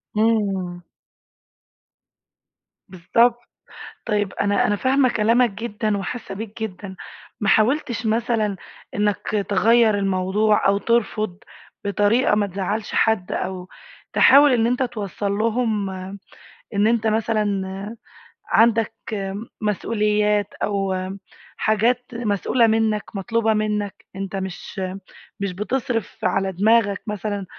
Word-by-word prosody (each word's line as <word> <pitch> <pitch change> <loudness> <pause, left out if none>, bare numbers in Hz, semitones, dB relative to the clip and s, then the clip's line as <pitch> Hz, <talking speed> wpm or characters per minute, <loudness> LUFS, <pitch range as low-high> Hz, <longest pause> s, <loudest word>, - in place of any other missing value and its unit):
امم. 200 -5 0 2.1
بالضبط، 230 +6 +1 0.6
طيب 205 -4 0
أنا 205 0 +1
أنا 205 - +2
فاهمة 260 +4 +2
كلامك 235 +2 +3
جدًا، 215 0 -2
وحاسة 195 +1 -5
بيك 220 +2 -6
جدًا، 190 -2 -6 0.4
ما 205 - 0
حاولتش 235 +1 +2
مثلًا 220 -2 0 0.4
إنك 205 0 0
تغيَّر 220 +2 +4
الموضوع 195 +2 +2
أو 200 0 +3
ترفض، 215 -3 0 0.5
بطريقة 205 +4 +2
ما 205 -1 +1
تزعلش 200 +3 -3
حد 220 -5 +2
أو 185 -1 -4 0.4
تحاول 285 +1 +7
إن 230 -2 +3
أنت 250 +2 +1
توصل 205 -4 -3
لهم، 215 -1 0 0.9
إن 205 +1 +3
أنت 225 0 +2
مثلًا 220 0 +1 1.0
عندك 225 -1 +3 0.7
مسئوليات، 210 0 +1
أو 195 -2 0 0.6
حاجات 230 +3 +1
مسئولة 230 +1 +1
منك، 220 -1 +1
مطلوبة 225 +3 +1
منك، 210 -2 -2
أنت 195 0 -5
مش 190 0 -5 0.6
مش 200 -2 -2
بتصرف 230 +2 -2
على 190 +1 +1
دماغك 205 +1 +2
مثلًا، 205 -1 -3
210 Hz, 100 wpm, -22 LUFS, 200-230 Hz, 2.1 s, تحاول